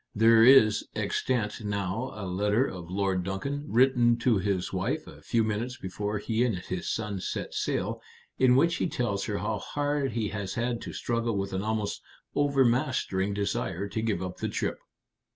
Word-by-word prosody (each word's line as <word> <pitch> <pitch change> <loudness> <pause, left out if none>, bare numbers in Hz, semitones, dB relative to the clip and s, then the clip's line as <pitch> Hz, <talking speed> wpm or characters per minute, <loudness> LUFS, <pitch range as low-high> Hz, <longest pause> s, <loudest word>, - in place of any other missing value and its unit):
There 115 +1 +6
is 115 -4 +7
extant 115 -4 -1
now 100 +4 -2
a 105 -2 -5
letter 105 +7 +1
of 90 -8 -7
Lord 95 -1 0
Duncan, 140 +11 -3
written 120 -1 +4
to 115 -3 +2
his 95 -2 -1
wife 115 +12 -1
a - - -13
few 115 -2 +1
minutes 110 +4 -2
before 105 +3 -3
he 110 +3 0
and 115 -7 +1
his 90 0 -4
son 105 -3 -3
set - - -4
sail, - - -2 0.4
in 130 -1 +5
which 170 +6 +3
he - - 0
tells 105 -10 -1
her 105 -2 -2
how 105 0 -2
hard 145 -1 -1
he 110 -3 -1
has 100 -2 -4
had 120 0 -1
to - - -7
struggle 115 -2 -1
with 95 0 -3
an 95 - -1
almost 110 0 -2 0.3
overmastering 125 -8 +1
desire 100 -2 -2
to 110 +3 -2
give 105 -5 -1
up 90 0 -5
the - - -2
trip. - - -2
110 Hz, 175 wpm, -28 LUFS, 100-125 Hz, 0.4 s, is